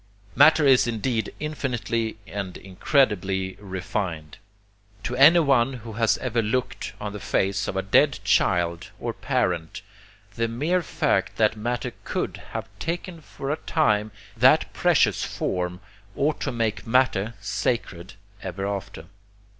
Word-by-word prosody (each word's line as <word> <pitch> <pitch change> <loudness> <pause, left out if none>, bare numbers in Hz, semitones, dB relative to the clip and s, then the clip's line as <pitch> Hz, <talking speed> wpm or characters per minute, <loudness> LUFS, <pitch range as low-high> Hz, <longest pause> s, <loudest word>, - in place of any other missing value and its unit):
Matter 155 +1 +6
is 130 -3 +5
indeed 115 -1 -1
infinitely 120 -7 -2
and 100 -3 -5
incredibly 95 -2 0
refined. 95 -5 -4 0.6
To 125 - -3
anyone 140 -3 +5
who 115 -3 -8
has 115 0 +2
ever 120 -2 -1
looked 120 +4 -2
on 105 -1 -5
the 105 - -6
face 100 0 0
of - - -3
a 95 - -1
dead 140 +8 +4
child 85 -2 +1
or - - -3
parent 85 -2 -2 0.5
the 115 0 -1
mere 150 +11 0
fact 160 - 0
that 110 0 +3
matter 120 +1 -3
COULD - - -3 0.2
have - - -4
taken 170 0 -4
for 140 -1 -6
a 150 - -1
time 110 -12 +1 0.2
that - - +4
precious - - +3
form, 90 0 -3 0.3
ought 150 +2 0
to - - -1
make 115 -3 -2
matter 115 -3 +2
sacred 95 -2 -3 0.3
ever 95 +1 -4
after. 100 -5 -5
110 Hz, 130 wpm, -25 LUFS, 95-130 Hz, 0.6 s, Matter